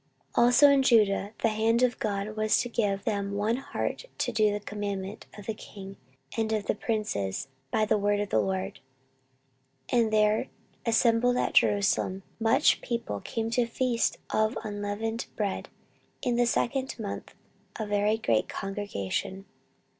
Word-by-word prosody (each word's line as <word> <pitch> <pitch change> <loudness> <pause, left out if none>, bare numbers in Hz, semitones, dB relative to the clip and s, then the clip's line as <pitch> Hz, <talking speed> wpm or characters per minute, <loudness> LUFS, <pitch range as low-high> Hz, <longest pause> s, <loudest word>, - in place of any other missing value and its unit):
14:030:012 235 - +4
Also 245 +4 +7
in 280 -1 +5
Judah 210 -5 +3
the 225 - +5
hand 225 +3 +2
of 245 -2 +2
God 205 0 -2
was 215 0 +2
to 245 - 0
give 205 -4 0
them 200 -1 -1
one 210 +4 +1
heart 270 - -4
to - - 0
do 215 -1 +3
the 205 - -2
commandment 205 0 -5
of 205 - -10
the 220 - -2
king 195 -2 -10 0.4
and 220 -1 0
of 215 -2 0
the - - +1
princes, 135 - -2 0.2
by 215 +9 +2
the 210 - +2
word 205 0 +2
of 205 -1 -2
the - - +3
LORD. 190 -1 -2 1.1
14:030:013 240 - +4
And 220 -1 +1
there 215 0 +3 0.4
assembled 230 +2 +3
at - - 0
Jerusalem 195 -1 +2 0.2
much 225 0 +4
people 230 - -3
to - - -10
keep 225 0 -1
the 240 0 +2
feast 235 0 0
of 215 0 +1
unleavened 210 +2 -3
bread 205 -3 -2 0.5
in 245 - +1
the 240 0 +3
second 265 +3 0
month, 210 -4 -6 0.4
a 220 - -1
very 205 +1 +1
great 115 - +1
congregation. 195 - -4
215 Hz, 160 wpm, -28 LUFS, 200-230 Hz, 1.1 s, Also